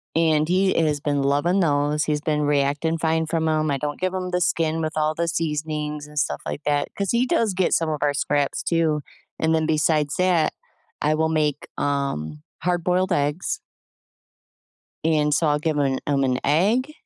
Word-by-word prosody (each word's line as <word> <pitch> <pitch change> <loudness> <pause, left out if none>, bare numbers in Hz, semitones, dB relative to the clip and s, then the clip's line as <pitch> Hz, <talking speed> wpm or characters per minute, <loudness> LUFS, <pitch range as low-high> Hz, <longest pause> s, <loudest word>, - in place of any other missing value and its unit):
And 155 -2 +3
he 190 +1 +3
is 150 -3 +1
been 145 -1 0
loving 145 +8 +2
those. 150 -1 +1
He's 150 -1 0
been 150 -1 0
reacting 145 +2 +1
fine 160 0 +1
from 160 0 0
‘em. 155 -1 +1
I 140 - 0
don't 145 +1 -4
give 185 0 -1
him 185 -1 -3
the 180 - 0
skin 165 -1 +1
with 155 0 -2
all 155 0 +1
the 170 0 -1
seasonings 150 -2 -2
and 150 0 -4
stuff 150 - -1
like - - -4
that 145 -1 +1
‘cause 200 -1 -1
he 240 +2 +2
does 225 -5 +1
get 185 -1 +1
some 165 -1 +1
of 155 -1 -2
our 145 0 +2
scraps 145 0 0
too. 160 -3 +1 0.4
And 160 0 +2
then 160 -1 +1
besides 155 -1 +1
that, 180 -4 +2 0.5
I 155 +1 +2
will 160 0 +1
make, 150 -2 0
um, 110 - -2 0.2
hard 175 -1 0
boiled 185 +2 +1
eggs. 145 +4 -1 1.4
And 150 -2 +2
so 160 +2 +2
I'll 150 0 +2
give 155 -1 -1
m 135 -2 +1
him 140 -1 +2
an 130 -1 +1
egg 210 - +2
155 Hz, 190 wpm, -23 LUFS, 145-165 Hz, 1.4 s, And